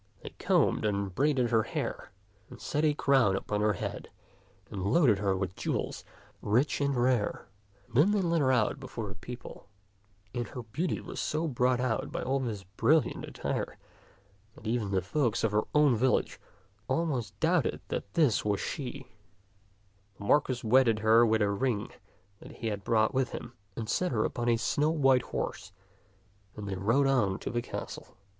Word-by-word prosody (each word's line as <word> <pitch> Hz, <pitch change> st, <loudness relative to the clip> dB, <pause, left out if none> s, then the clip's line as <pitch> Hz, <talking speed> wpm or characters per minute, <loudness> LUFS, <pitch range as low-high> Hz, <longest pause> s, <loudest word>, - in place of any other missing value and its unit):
They -, -, -7 dB
combed -, -, +2 dB
and 100 Hz, -3 st, -1 dB
braided 135 Hz, 0 st, +1 dB
her 115 Hz, -1 st, +4 dB
hair -, -, -4 dB, 0.4 s
and 125 Hz, -, -12 dB
set 150 Hz, -, -2 dB
a 150 Hz, -2 st, +3 dB
crown 135 Hz, -10 st, +3 dB
upon 105 Hz, +1 st, -2 dB
her 105 Hz, 0 st, +3 dB
head -, -, -5 dB, 0.6 s
and 100 Hz, -4 st, -4 dB
loaded 125 Hz, -, +4 dB
her 100 Hz, -2 st, +1 dB
with 95 Hz, -1 st, -3 dB
jewels -, -, -3 dB, 0.4 s
rich 125 Hz, +8 st, +1 dB
and 140 Hz, -1 st, +1 dB
rare. 120 Hz, -3 st, +1 dB, 0.4 s
Then 135 Hz, -, +3 dB
they 205 Hz, -2 st, +2 dB
led 170 Hz, -2 st, +1 dB
her 130 Hz, -2 st, +3 dB
out 125 Hz, +2 st, +1 dB
before 120 Hz, -5 st, -6 dB
the -, -, -7 dB
people; 120 Hz, +1 st, -10 dB, 0.7 s
and 120 Hz, -2 st, -3 dB
her 125 Hz, -, -7 dB
beauty 150 Hz, +12 st, -2 dB
was -, -, -7 dB
so 155 Hz, +2 st, -1 dB
brought 125 Hz, -2 st, +1 dB
out 125 Hz, -3 st, -1 dB
by -, -, -3 dB
all 135 Hz, +2 st, 0 dB
this 110 Hz, -7 st, -4 dB
brilliant 140 Hz, -, +1 dB
attire -, -, -4 dB, 0.8 s
that -, -, -15 dB
even 110 Hz, -2 st, -1 dB
the 95 Hz, -2 st, 0 dB
folk 120 Hz, -, 0 dB
of 110 Hz, -, +2 dB
her 105 Hz, +1 st, +1 dB
own 150 Hz, -4 st, +5 dB
village 125 Hz, +3 st, +1 dB, 0.5 s
almost 125 Hz, -, -1 dB
doubted -, -, +1 dB
that 100 Hz, -, -5 dB
this 150 Hz, -9 st, +3 dB
was 105 Hz, -1 st, 0 dB
she. 135 Hz, -2 st, -5 dB, 1.1 s
The -, -, -10 dB
Marquis 130 Hz, 0 st, +2 dB
wedded 115 Hz, -1 st, +4 dB
her 110 Hz, +2 st, +5 dB
with 110 Hz, -1 st, +2 dB
a 100 Hz, -, +1 dB
ring 110 Hz, 0 st, -1 dB, 0.5 s
that -, -, -12 dB
he 115 Hz, -, -4 dB
had 100 Hz, -2 st, -4 dB
brought 110 Hz, +3 st, +2 dB
with 130 Hz, -1 st, 0 dB
him, 120 Hz, -, -7 dB, 0.2 s
and 115 Hz, -2 st, -4 dB
set 180 Hz, +9 st, 0 dB
her 110 Hz, -3 st, +1 dB
upon 120 Hz, -1 st, -1 dB
a 115 Hz, -, +3 dB
snow 145 Hz, +6 st, +1 dB
white 135 Hz, -5 st, +3 dB
horse, 95 Hz, -, -4 dB, 0.8 s
and 105 Hz, -1 st, -7 dB
they 100 Hz, -, -3 dB
rode 115 Hz, +9 st, +2 dB
on 115 Hz, -9 st, +2 dB
to -, -, -5 dB
the 120 Hz, 0 st, -1 dB
castle. -, -, -8 dB
120 Hz, 175 wpm, -30 LUFS, 105-135 Hz, 1.1 s, own